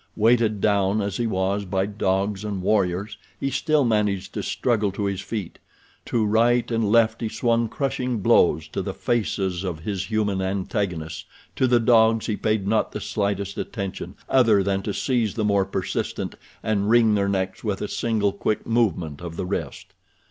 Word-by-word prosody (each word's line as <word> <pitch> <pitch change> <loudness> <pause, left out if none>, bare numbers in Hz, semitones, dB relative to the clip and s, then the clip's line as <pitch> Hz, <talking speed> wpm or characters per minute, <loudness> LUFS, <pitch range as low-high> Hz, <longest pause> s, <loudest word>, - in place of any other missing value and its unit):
Weighted 110 -1 +3
down 100 0 +2
as 100 -2 -2
he 120 - 0
was 95 0 0
by 95 0 -1
dogs 100 0 -1
and 100 -3 -4
warriors 95 0 0 0.2
he 135 - -1
still 150 0 +2
managed 105 -4 0
to - - -3
struggle 110 -5 0
to 100 +1 -2
his 100 -1 -2
feet. 100 -2 -5 0.5
To 115 -3 0
right 120 +3 +2
and 115 -3 +1
left 115 0 +3
he 115 - -1
swung 115 +1 +1
crushing 130 -2 -2
blows 80 -5 +3
to - - -3
the - - -5
faces 100 -6 -1
of 85 -4 -4
his 100 +1 -3
human 105 -3 0
antagonists—to 95 - -3
the 120 -1 +4
dogs 115 -1 +4
he 110 - -1
paid 105 -2 -1
not 110 +1 +1
the - - -3
slightest 100 -1 -2
attention 100 -5 -5
other 115 -7 +4
than 95 0 0
to 105 - -3
seize 120 -6 0
the 110 - 0
more 100 -2 +2
persistent 95 - -3 0.3
and 105 -1 0
wring 115 -2 +5
their 100 -1 +1
necks 95 -1 -2
with 105 -4 -2
a - - -3
single 110 -3 0
quick 105 +1 -2
movement 90 -11 0
of 85 -1 -6
the 90 - -3
wrist. 95 - -5
105 Hz, 175 wpm, -24 LUFS, 95-115 Hz, 0.5 s, wring